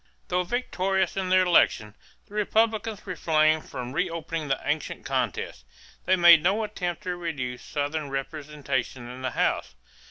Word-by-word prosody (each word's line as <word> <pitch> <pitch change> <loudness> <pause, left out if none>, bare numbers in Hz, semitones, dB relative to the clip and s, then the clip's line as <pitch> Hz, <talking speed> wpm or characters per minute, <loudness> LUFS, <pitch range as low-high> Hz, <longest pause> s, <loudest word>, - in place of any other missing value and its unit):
Though 180 0 +2
victorious 190 -3 -1
in 190 -1 -2
the 185 - +5
election, 110 - +3 0.3
the - - -18
Republicans 220 0 0
refrained 155 -4 +2
from 125 0 -6
reopening 165 -1 -2
the 135 - 0
ancient 145 +1 -2
contest; 125 - -2 0.4
they 185 - +4
made 170 -3 +8
no 210 +7 +2
attempt 180 -5 -4
to 180 -1 -2
reduce 140 -8 -4
Southern 145 0 -3
representation 135 -3 -4
in 125 +1 -8
the 130 - -1
House. 60 - -1
160 Hz, 140 wpm, -26 LUFS, 135-185 Hz, 0.4 s, made